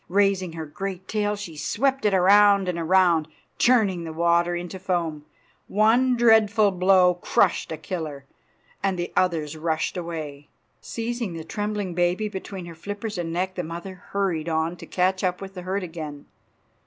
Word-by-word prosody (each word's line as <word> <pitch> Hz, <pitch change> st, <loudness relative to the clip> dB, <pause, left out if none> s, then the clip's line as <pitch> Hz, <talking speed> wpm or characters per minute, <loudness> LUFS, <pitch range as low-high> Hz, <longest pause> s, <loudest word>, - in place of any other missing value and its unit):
Raising 195 Hz, -2 st, +2 dB
her 160 Hz, -1 st, -5 dB
great 190 Hz, +4 st, -6 dB
tail 210 Hz, -1 st, 0 dB
she 200 Hz, -6 st, -8 dB
swept 265 Hz, -, 0 dB
it 205 Hz, -, +3 dB
around 200 Hz, +1 st, +5 dB
and 175 Hz, -2 st, -2 dB
around, 170 Hz, -2 st, +3 dB, 0.3 s
churning 210 Hz, -8 st, +3 dB
the 165 Hz, -, -5 dB
water 170 Hz, +1 st, +2 dB
into 175 Hz, +2 st, -6 dB
foam. 170 Hz, -5 st, -2 dB, 0.4 s
One 240 Hz, +5 st, +3 dB
dreadful 220 Hz, -3 st, +5 dB
blow 185 Hz, -1 st, +4 dB
crushed 175 Hz, -, +1 dB
a 160 Hz, -, -3 dB
killer, 155 Hz, -5 st, -5 dB, 0.6 s
and 195 Hz, -2 st, 0 dB
the 175 Hz, 0 st, -4 dB
others 160 Hz, -4 st, 0 dB
rushed 160 Hz, +2 st, -1 dB
away. 155 Hz, -4 st, -6 dB, 0.3 s
Seizing 230 Hz, -4 st, -4 dB
the 165 Hz, -1 st, -6 dB
trembling 205 Hz, +1 st, -3 dB
baby 180 Hz, +5 st, +1 dB
between 190 Hz, -2 st, -7 dB
her 170 Hz, -, -9 dB
flippers 205 Hz, +4 st, -5 dB
and 165 Hz, -1 st, -3 dB
neck 185 Hz, +2 st, -1 dB
the 185 Hz, -, -3 dB
mother 170 Hz, +4 st, -6 dB, 0.2 s
hurried 180 Hz, -5 st, -1 dB
on 160 Hz, +1 st, 0 dB
to -, -, -11 dB
catch 185 Hz, +1 st, 0 dB
up 180 Hz, -1 st, 0 dB
with 195 Hz, -1 st, -8 dB
the 180 Hz, -, -7 dB
herd 190 Hz, +2 st, -2 dB
again. 155 Hz, -4 st, -7 dB
180 Hz, 165 wpm, -24 LUFS, 165-200 Hz, 0.6 s, around